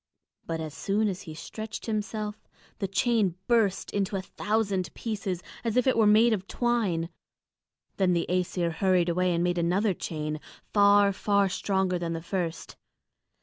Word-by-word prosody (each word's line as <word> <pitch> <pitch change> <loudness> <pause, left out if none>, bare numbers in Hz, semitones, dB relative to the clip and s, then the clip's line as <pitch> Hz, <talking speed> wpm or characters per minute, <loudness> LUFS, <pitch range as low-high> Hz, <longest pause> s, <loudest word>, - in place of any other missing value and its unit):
But 165 -1 -2
as 155 -2 -5
soon 210 +2 0
as 190 -2 -3
he 155 - -9
stretched 215 +6 -7
himself, 215 -1 -3 0.3
the 195 - -1
chain 200 -2 +1
burst 220 -5 +2
into 200 -1 -1
a 190 - -2
thousand 200 -4 -1
pieces, 200 -5 -3 0.2
as 230 0 -1
if 250 - +4
it 260 - +3
were 225 -2 +4
made 220 +3 +6
of 195 -2 -3
twine. 210 -9 0 0.9
Then 185 -2 +3
the 170 -1 +1
Æsir 180 -1 0
hurried 180 +1 +2
away 180 +1 +1
and 170 - +1
made 175 0 +1
another 185 +5 +2
chain, 155 -2 -4 0.3
far, 200 -1 +5
far 200 0 +2
stronger 190 -1 0
than 170 -1 -2
the 165 -1 -5
first. 175 -3 -4
195 Hz, 160 wpm, -28 LUFS, 175-215 Hz, 0.9 s, made